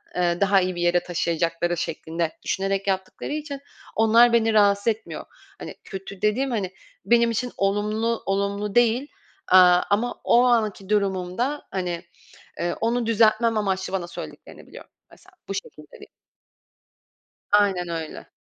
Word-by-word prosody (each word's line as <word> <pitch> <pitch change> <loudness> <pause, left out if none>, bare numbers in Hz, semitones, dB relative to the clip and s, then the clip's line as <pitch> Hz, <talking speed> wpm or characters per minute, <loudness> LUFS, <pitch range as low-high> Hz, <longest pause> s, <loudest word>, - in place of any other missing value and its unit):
eee, 175 0 0
daha 195 -1 +4
iyi 185 0 -2
bir 175 - -4
yere 175 0 +3
taşıyacakları 170 0 -1
şeklinde 165 +1 -3
düşünerek 195 +1 -2
yaptıkları 190 +6 -3
için 295 -2 -5 0.4
onlar 230 +2 +5
beni 225 -1 +3
rahatsız 200 0 +3
etmiyor. 225 -1 -2 0.3
Hani, - - -8
kötü 195 0 -9
dediğim, 250 +6 +1
hani, 195 -5 -2 0.3
benim 235 +2 +4
için 245 +2 -2
olumlu 210 +3 0
olumlu 200 +1 -2
değil, 240 +3 +3 0.4
aaa, 180 -1 +7
ama 220 +4 0
o 240 - +4
anki 215 -5 +1
durumumda 200 +7 -1
hani, 175 -2 -3 0.6
ııı, 175 0 -1
onu 235 +1 0
düzeltmem 225 0 +3
amaçlı 190 -2 -2
bana 185 -3 -2
söylediklerini - - -10
biliyorum. - - -13 0.2
Mesela 385 - -20 0.2
bu 195 - -3
şekilde 150 -6 -8
değil. - - -13 1.4
Aynen 195 -4 +3
öyle. 165 -2 -6
200 Hz, 135 wpm, -24 LUFS, 180-225 Hz, 1.4 s, aaa